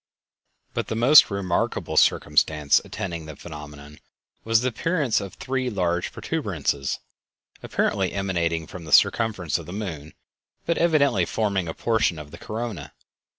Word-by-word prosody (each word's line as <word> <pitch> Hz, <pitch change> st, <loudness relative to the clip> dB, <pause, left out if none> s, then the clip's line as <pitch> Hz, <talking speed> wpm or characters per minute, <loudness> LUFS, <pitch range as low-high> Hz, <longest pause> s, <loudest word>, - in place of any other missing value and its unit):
But -, -, -2 dB
the -, -, -3 dB
most 130 Hz, +7 st, +7 dB
remarkable 100 Hz, -3 st, -2 dB
circumstance 75 Hz, -1 st, +3 dB
attending 85 Hz, -4 st, -6 dB
the 80 Hz, -, -8 dB
phenomenon 75 Hz, -1 st, -11 dB, 0.4 s
was 115 Hz, 0 st, +3 dB
the 130 Hz, -, +1 dB
appearance 140 Hz, -, 0 dB
of 100 Hz, -1 st, -8 dB
three 130 Hz, +1 st, -2 dB
large 90 Hz, -5 st, -1 dB
protuberances 70 Hz, -1 st, -2 dB, 0.6 s
apparently 95 Hz, -2 st, 0 dB
emanating 85 Hz, -4 st, -1 dB
from 85 Hz, +1 st, -10 dB
the 75 Hz, -, -4 dB
circumference 105 Hz, -8 st, +3 dB
of 85 Hz, -, -10 dB
the 90 Hz, -, -7 dB
moon, 80 Hz, -7 st, -6 dB, 0.5 s
but 170 Hz, -, 0 dB
evidently 140 Hz, -, +3 dB
forming 100 Hz, -3 st, -1 dB
a 80 Hz, -, -5 dB
portion 110 Hz, -7 st, +1 dB
of 75 Hz, -1 st, -9 dB
the -, -, -11 dB
corona. 105 Hz, -10 st, -5 dB
95 Hz, 140 wpm, -24 LUFS, 80-115 Hz, 0.6 s, most